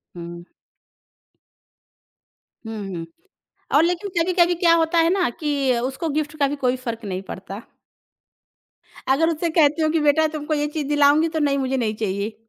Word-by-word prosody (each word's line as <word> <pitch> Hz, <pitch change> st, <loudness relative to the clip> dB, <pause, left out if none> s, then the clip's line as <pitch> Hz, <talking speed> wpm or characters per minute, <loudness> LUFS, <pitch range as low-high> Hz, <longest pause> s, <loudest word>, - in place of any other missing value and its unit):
हुँ। 170 Hz, 0 st, -9 dB, 2.2 s
हुँ, 225 Hz, 0 st, -6 dB, 0.2 s
हुँ। 165 Hz, -1 st, -5 dB, 0.7 s
और 300 Hz, -, +6 dB
लेकिन 355 Hz, +4 st, -1 dB
कभी-कभी 350 Hz, +1 st, +3 dB
क्या 335 Hz, -1 st, +4 dB
होता 330 Hz, 0 st, +2 dB
है 330 Hz, +1 st, +4 dB
ना 370 Hz, -10 st, +1 dB
कि 280 Hz, -5 st, 0 dB
उसको 270 Hz, +5 st, -3 dB
गिफ्ट 300 Hz, +1 st, -2 dB
का 280 Hz, -, +3 dB
भी 290 Hz, -, -3 dB
कोई 250 Hz, -, +2 dB
फ़र्क 230 Hz, -2 st, -5 dB
नहीं 190 Hz, -1 st, -4 dB
पड़ता। 195 Hz, +2 st, -7 dB, 1.5 s
अगर 325 Hz, +4 st, +2 dB
उससे 330 Hz, +1 st, -1 dB
कहती 305 Hz, 0 st, +4 dB
हूँ 310 Hz, -, +2 dB
कि 325 Hz, -, +1 dB
बेटा 305 Hz, +2 st, +3 dB
तुमको 305 Hz, 0 st, -4 dB
ये 295 Hz, 0 st, 0 dB
चीज़ 295 Hz, -2 st, -4 dB
दिलाऊँगी 295 Hz, +2 st, +4 dB
तो, 320 Hz, -, -3 dB
नहीं 285 Hz, -2 st, +1 dB
मुझे 265 Hz, 0 st, -1 dB
नहीं 220 Hz, -3 st, -1 dB
चाहिए। 205 Hz, 0 st, -3 dB
295 Hz, 165 wpm, -22 LUFS, 245-325 Hz, 2.2 s, और